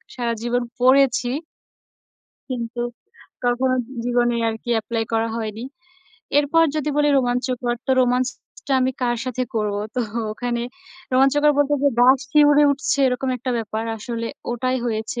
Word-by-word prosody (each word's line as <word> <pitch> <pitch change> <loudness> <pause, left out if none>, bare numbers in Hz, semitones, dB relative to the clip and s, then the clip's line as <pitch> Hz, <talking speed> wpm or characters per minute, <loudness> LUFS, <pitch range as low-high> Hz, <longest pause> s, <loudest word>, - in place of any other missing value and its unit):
সারা 235 -2 -1
জীবন 240 +1 0 0.2
পড়েছি 255 -1 +4 1.2
কিন্তু 240 -1 -4 0.6
কখনো 255 +1 +2 0.3
জীবনে 240 -1 +1
আর 225 - -2
কি 240 - -5
apply 225 +1 -2
করা 225 0 +1
হয়নি। 220 +1 -5 0.7
এরপর 295 +3 +3
যদি 300 -1 -1
বলি 295 0 +3
রোমাঞ্চকর 245 -1 -1
তো - - 0
romance 250 0 +2 0.4
টা - - +1
আমি 260 +1 +1
কার 240 -1 +1
সাথে 255 0 -2
করব? 210 -2 0 0.2
তো 250 - 0 0.3
ওখানে 240 +1 -3 0.5
রোমাঞ্চকর 275 +3 +4
বলতে 290 0 +3
যে, 285 - +5
গা 250 +1 +8 0.2
শিউরে 295 0 +5
উঠছে 275 0 -1
এরকম 250 +1 -2
একটা 250 +1 -4
ব্যাপার। 220 0 -3
আসলে 230 +1 -4 0.2
ওটাই 255 +2 -1
হয়েছে। 220 +1 -3
245 Hz, 140 wpm, -22 LUFS, 235-265 Hz, 1.2 s, গা